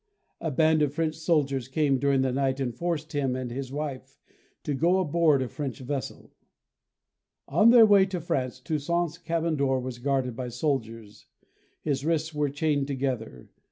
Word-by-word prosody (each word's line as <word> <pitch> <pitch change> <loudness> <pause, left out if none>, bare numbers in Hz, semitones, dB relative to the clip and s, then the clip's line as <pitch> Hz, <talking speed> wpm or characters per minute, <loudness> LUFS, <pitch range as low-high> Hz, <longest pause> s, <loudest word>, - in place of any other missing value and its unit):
A 165 - -2
band 155 +2 +3
of 145 -1 0
French 160 -1 0
soldiers 150 -5 0
came 135 -1 +1
during 140 0 +2
the 130 - 0
night 135 +1 0
and 125 -3 -2
forced 160 +3 -3
him 135 -3 0
and 130 -2 -4
his 130 +1 -5
wife 135 -2 -5 0.5
to 150 - -2
go 170 +7 +2
aboard 160 -5 +2
a - - -4
French 140 -1 -5
vessel. 135 0 -5 1.2
On 190 +11 +5
their 235 -1 +8
way 200 -2 +5
to 185 -2 -3
France 130 -6 -2
Toussaint's 165 +4 -2
cabin 165 -2 -1
door 135 -2 +1
was 125 -1 -6
guarded 130 -2 -1
by 125 0 -4
soldiers. 115 -5 -4 0.6
His 140 -3 -1
wrists 160 0 0
were 150 -1 0
chained 145 0 0
together. 130 - -4
140 Hz, 165 wpm, -27 LUFS, 130-160 Hz, 1.2 s, their